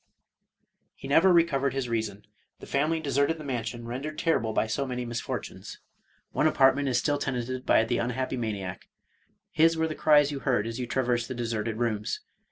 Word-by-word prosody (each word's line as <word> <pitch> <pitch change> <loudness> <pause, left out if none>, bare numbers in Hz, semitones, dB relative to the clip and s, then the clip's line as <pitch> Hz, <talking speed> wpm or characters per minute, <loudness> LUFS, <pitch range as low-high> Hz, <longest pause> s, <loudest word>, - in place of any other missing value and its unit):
He - - -9
never 165 +7 +5
recovered 140 -6 +2
his 135 -2 -1
reason; 110 -3 -3 0.3
the - - -10
family 155 +4 0
deserted 140 +1 +1
the 155 - -9
man 125 -5 -2
sion 120 +1 -6
rendered 135 +6 -5
terrible 115 -10 +1
by 110 - +1
so 135 +6 -2
many 125 -1 -3
misfortunes. 120 -1 -5 0.5
One 155 - +2
apart 135 -3 +5
ment 140 0 -1
is 125 -2 +2
still 145 +3 +1
tenanted 130 -1 -3
by - - +5
the 120 +2 -1
unhappy 130 +2 -2
maniac; 100 -6 -4 0.6
his 165 +1 +4
were 160 0 +1
the 155 - -3
cries 150 -2 +4
you 140 - -4
heard 120 -4 +1
as 115 +2 -5
you 125 - -3
traversed 120 -2 0
the 130 - -5
deserted 115 -2 -2
rooms. 110 -3 -1
130 Hz, 185 wpm, -27 LUFS, 115-145 Hz, 0.6 s, never